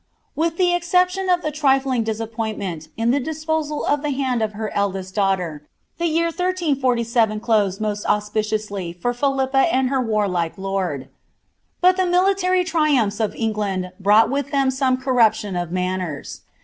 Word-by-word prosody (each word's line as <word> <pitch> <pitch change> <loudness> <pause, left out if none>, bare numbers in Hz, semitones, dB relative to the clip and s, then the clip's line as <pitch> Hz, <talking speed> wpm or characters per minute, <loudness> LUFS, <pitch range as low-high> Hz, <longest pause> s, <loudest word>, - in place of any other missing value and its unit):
With 325 +2 0
the 360 -1 +3
exception 365 +2 +1
of 355 -1 +2
the 305 - -1
trifling 270 -4 +2
disappointment 220 -6 -4
in 230 +1 +2
the 280 - +2
disposal 310 +1 -2
of 290 0 +1
the 295 - -2
land 260 -4 -1
of 215 -1 -1
her 215 0 -4
eldest 190 -2 -2
daughter, 180 -7 -1 0.3
the 340 - +1
year 330 +1 +1
1347 260 - 0
closed 210 -4 +1
most 210 -1 -2
auspiciously 210 -3 -1
for 245 +8 -2
Philippe 270 +1 0
and 260 -4 +1
her 265 -1 +1
waiiike 200 -7 0
lord. 190 -8 -3 0.7
But 365 +1 +5
the 370 -1 +2
military 365 0 +2
triumphs 295 - +1
of 220 -2 -1
England 205 -5 -2
mmght 210 +5 +5
with 280 0 -1
them 275 -2 +2
some 260 -1 +1
corruption 225 -6 +2
of 175 -1 -3
manners. 180 -4 -3
235 Hz, 150 wpm, -21 LUFS, 205-300 Hz, 0.7 s, But